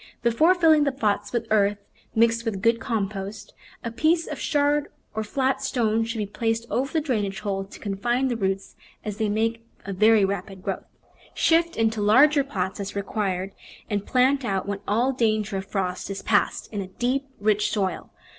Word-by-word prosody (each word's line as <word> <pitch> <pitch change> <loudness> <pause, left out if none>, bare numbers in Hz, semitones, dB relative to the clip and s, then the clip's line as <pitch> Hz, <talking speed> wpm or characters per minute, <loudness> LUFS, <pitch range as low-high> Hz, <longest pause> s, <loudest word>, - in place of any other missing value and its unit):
Before 305 +10 +4
filling 320 -4 +5
the 280 - +1
pots 210 -6 -1
with 235 -2 -1
earth 205 -1 +3 0.4
mixed 230 0 +3
with 205 -4 -3
good 230 0 +3
compost, 205 -3 -4 0.3
a 230 - -3
piece 320 +7 +2
of - - -6
shard, 290 -1 +1 0.3
or 220 +1 -2
flat 265 +4 0
stone, 225 -2 +1
should 230 0 -4
be 210 - -1
placed 225 +2 -1
over 270 +3 0
the 320 - +1
drainage 215 -10 -2
hole 195 -2 -2
to 195 - -13
confine 240 +6 0
the 245 - -1
roots, 195 -3 -2 0.3
as 210 -1 -4
they 220 -2 0
make 225 +2 0 0.2
a 200 - -4
very 215 +1 +5
rapid 195 -1 -4
growth. - - -3 0.5
Shift 335 +1 +2
into 220 -1 +1
larger 280 +8 +5
pots 190 -9 -3
as 200 0 -5
required, 195 -2 -2 0.4
and 205 -1 0
plant 265 +4 +2
out 195 -5 -1
when 200 -1 -2
all 235 +6 +2
danger 215 -4 0
of 190 0 -5
frost 185 -2 -2
is 195 - -5
past 205 -2 +1
in 205 - -2
a 190 - -6
deep, 250 +8 -1
rich 210 0 +2
soil. 190 -4 -2
220 Hz, 185 wpm, -25 LUFS, 200-250 Hz, 0.5 s, filling